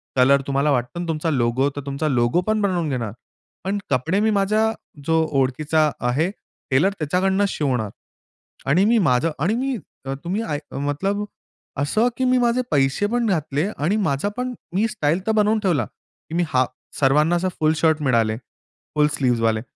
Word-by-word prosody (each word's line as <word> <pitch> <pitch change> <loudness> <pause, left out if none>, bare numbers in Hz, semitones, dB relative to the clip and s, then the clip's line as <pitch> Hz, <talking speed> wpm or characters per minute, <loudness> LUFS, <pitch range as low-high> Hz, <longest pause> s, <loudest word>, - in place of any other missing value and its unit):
Colour 135 +2 +5
तुम्हाला 140 +2 +1
वाटतो 125 +6 -1
ना, 175 - -3
तुमचा 160 0 -1
लोगो, 130 0 +1
तर 145 - -4
तुमचा 140 +3 -2
लोगो 125 +5 +2
पण 215 0 +1
बनवून 180 -5 0
घेणार. 120 -6 -2 0.5
पण 195 +2 -1
कपडे 140 +9 +1
मी 220 +1 +2
माझ्या 215 +2 +2 0.3
जो 160 0 +3 0.2
ओळखीचा 150 +4 +2 0.2
आहे, 155 +8 +1 0.4
टेलर, 145 +9 +4
त्याच्याकडनं 190 +6 +1
शिवणार. 125 -10 -1 0.8
आणि 170 +9 +3
मी 230 +1 +4
माझं 125 +6 +2
आणि 185 +10 +1
मी 260 0 -1 0.3
अ, 135 - -2
तुम्ही 190 +6 -1
आय 150 -9 -2
अ, - - -9
मतलब 195 +9 -1 0.5
असं 215 - +2
की 260 - +1
मी 255 0 +3
माझे 240 +1 +2
पैसे 135 +7 +2
पण 240 +2 0
घातले 155 -2 0
आणि 165 +8 +1
माझा 140 +9 0
पण 250 0 -2 0.2
मी 215 +4 +3
स्टाईल 165 -6 0
तर - - +3
बनवून 215 0 +3
ठेवला, 175 -7 +2
की 165 - -14
मी 175 - +2
हा 130 -3 +3 0.4
सर्वांना 150 +5 +3
असं 180 +2 0
फुल 155 0 +3
शर्ट 160 -2 +2
मिळाले. 115 -4 +2 0.6
फुल 150 0 +4
स्लीव्हजवाले. 115 -4 +1
155 Hz, 175 wpm, -22 LUFS, 135-200 Hz, 0.8 s, Colour